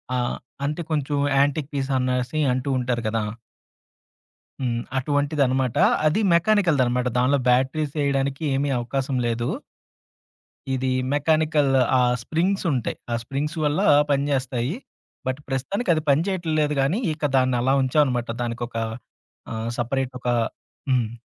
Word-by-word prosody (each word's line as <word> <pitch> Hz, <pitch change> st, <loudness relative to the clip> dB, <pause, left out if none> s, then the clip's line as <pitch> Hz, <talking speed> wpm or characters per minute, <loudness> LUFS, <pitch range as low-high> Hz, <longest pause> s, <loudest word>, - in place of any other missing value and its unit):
ఆహ్, 125 Hz, -1 st, -1 dB, 0.3 s
అంటే 150 Hz, +4 st, -2 dB
కొంచెం 145 Hz, -1 st, 0 dB, 0.2 s
యాంటిక్ 145 Hz, +1 st, +1 dB
పీస్ 135 Hz, -1 st, -2 dB
అనేసి 125 Hz, +3 st, -1 dB
అంటూ 130 Hz, +2 st, -2 dB
ఉంటారు 125 Hz, -1 st, -1 dB
కదా! 110 Hz, -1 st, -1 dB, 1.4 s
హ్మ్. 120 Hz, -2 st, 0 dB, 0.2 s
అటువంటిదనమాట. 140 Hz, -3 st, +1 dB, 0.3 s
అది 160 Hz, +8 st, +3 dB
మెకానికల్‌దనమాట. 155 Hz, -, +2 dB
దానిలో 130 Hz, +3 st, +3 dB
బ్యాటరీస్‌ 135 Hz, +4 st, +1 dB
ఎయ్యడానికి 140 Hz, +1 st, 0 dB
ఏమీ 140 Hz, +1 st, 0 dB
అవకాశం 130 Hz, +2 st, -2 dB
లేదు. 120 Hz, 0 st, -1 dB, 1.3 s
ఇది 130 Hz, 0 st, -1 dB, 0.2 s
మెకానికల్ 155 Hz, -1 st, +2 dB, 0.3 s
ఆ -, -, +4 dB, 0.2 s
స్ప్రింగ్స్ 185 Hz, +7 st, 0 dB
ఉంటాయి. 125 Hz, -4 st, -2 dB, 0.2 s
ఆ -, -, +1 dB
స్ప్రింగ్స్ 145 Hz, +6 st, -3 dB
వల్ల 150 Hz, +5 st, +1 dB, 0.3 s
పనిచేస్తాయి. 135 Hz, 0 st, 0 dB, 0.5 s
బట్ 130 Hz, +3 st, -2 dB
ప్రస్తుతానికి 155 Hz, -, -2 dB
అది 155 Hz, -, -1 dB
పని 140 Hz, +4 st, +4 dB
చేయట 190 Hz, -3 st, -2 dB, 0.2 s
లేదు 150 Hz, 0 st, +1 dB
కానీ, 150 Hz, +10 st, +1 dB
ఇక 150 Hz, 0 st, -6 dB
దాన్ని 130 Hz, -1 st, +3 dB
అలా 130 Hz, +2 st, +2 dB
ఉంచాం 130 Hz, +4 st, +3 dB
అనమాట. 120 Hz, -3 st, -2 dB
దానికొక, 120 Hz, 0 st, -4 dB, 0.8 s
ఆహ్, 110 Hz, +1 st, -3 dB
సెపరేట్ 130 Hz, +2 st, -1 dB
ఒక 125 Hz, -, -4 dB, 0.6 s
హ్మ్. 120 Hz, -4 st, +2 dB
135 Hz, 125 wpm, -23 LUFS, 125-150 Hz, 1.4 s, ఆ